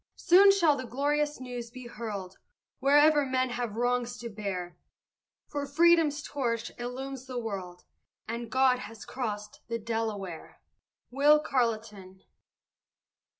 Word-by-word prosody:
Soon 390 +3 +7
shall 340 -7 +4
the 260 -2 -6
glorious 295 +3 0
news 245 -2 -6
be 255 +1 -10
hurled 210 -5 -6 0.4
Wherever 290 +2 +5
men 260 -1 0
have 240 -3 -3
wrongs 245 +1 0
to 235 -1 -6
bear; 195 -5 -5 0.7
For 285 -1 -4
freedom's 315 -1 +4
torch 235 -5 -2
illumes 260 +2 -6
the 255 -1 -5
world, 190 -6 -5 0.4
And 235 +1 -4
God 260 0 +3
has 225 -2 -9
crossed 210 -5 -5
the 230 - -2
Delaware! 215 -6 -4 0.5
WILL 295 +3 +5
CARLETON. 215 -8 -2
245 Hz, 120 wpm, -29 LUFS, 220-275 Hz, 0.7 s, Soon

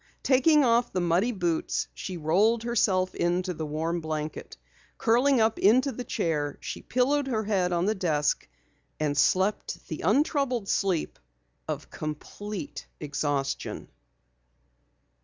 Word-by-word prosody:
Taking 290 +3 +5
off 235 0 +3
the 185 - -1
muddy 175 +7 +2
boots, 175 -6 -1
she 185 - -6
rolled 200 +9 +2
herself 195 -6 +1
into 180 +1 0
the 155 -2 -5
warm 165 +3 -2
blanket. 155 -1 -5 0.4
Curling 250 +3 +3
up 220 0 +2
into 255 +7 +4
the 250 +1 -6
chair 150 - -1
she - - -6
pillowed 270 +3 +1
her 220 -4 0
head 190 -4 +1
on 175 0 +1
the 215 - +2
desk 155 -7 0 0.5
and 150 -2 0
slept 190 +7 +1
the 155 - -4
untroubled 255 - +1
sleep 190 -6 0 0.5
of - - -5
complete 205 - -6
exhaustion. 145 -1 -2
190 Hz, 125 wpm, -27 LUFS, 160-235 Hz, 0.5 s, Taking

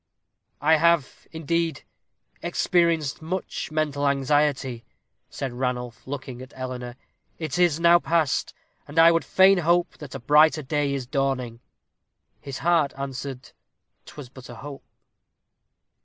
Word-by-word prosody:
"I 160 +2 +4
have, 170 -3 +1
indeed, 165 +1 -2 0.6
experienced 165 -5 +1
much 180 +4 -4
mental 150 -2 0
anxiety," 140 -3 0 0.5
said 130 -3 -5
Ranulph, 125 -1 -4
looking 130 -2 -6
at 130 +1 -12
Eleanor; 125 -1 -6 0.4
"it 160 0 -4
is 170 -3 +3
now 170 0 +6
past, 165 -4 0 0.4
and 145 - -11
I 165 +1 +8
would 165 0 +1
fain 190 0 +5
hope 175 +1 +1
that 145 -3 -9
a - - -5
brighter 150 +4 +4
day 145 0 -1
is 135 -2 -4
dawning." 130 -3 -2 0.8
His 140 -2 -7
heart 165 -5 +3
answered, 135 -1 -6 0.6
'twas 145 -5 -10
but 130 -1 -13
a 120 - -9
hope. 140 +4 -9
145 Hz, 125 wpm, -24 LUFS, 130-165 Hz, 0.8 s, I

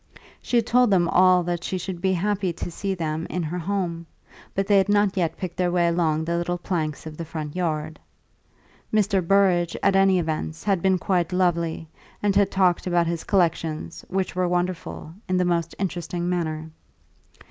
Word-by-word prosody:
She 245 - 0
had 230 - +2
told 250 0 +4
them 180 -4 +3
all 185 0 +5
that 175 0 -3
she 185 - -2
should 180 -1 -5
be 190 0 +2
happy 195 0 0
to 170 +1 -6
see 195 +3 -3
them 160 -1 -3
in 180 - -2
her 170 +3 -3
home, 170 -2 -3 0.5
but 195 - +1
they 200 0 +5
had 195 - +1
not 205 -1 +3
yet 170 -4 -1
picked 185 -2 -6
their 180 -1 +1
way 175 -1 +2
along 160 -2 +1
the 170 +1 -1
little 175 +1 -2
planks 160 -5 -3
of 155 -1 -8
the 170 - -4
front 155 -1 -6
yard. 155 -3 -2 0.9
Mr. 200 -3 +2
Burrage, 175 -2 +3
at 195 -1 +4
all 195 0 +5
events, 160 -3 -1
had 195 -4 +1
been 190 0 +3
quite 180 -1 0
lovely, 170 -3 0 0.4
and 200 -1 +2
had 200 -1 +4
talked 185 -2 +2
about 175 -1 +2
his 165 0 -2
collections, 165 -4 -1
which 190 0 -2
were 180 0 +1
wonderful, 175 -2 -3 0.2
in 185 - +2
the 180 - +2
most 170 -2 0
interesting 175 -2 -3
manner. 160 -3 -2
175 Hz, 190 wpm, -24 LUFS, 165-190 Hz, 0.9 s, all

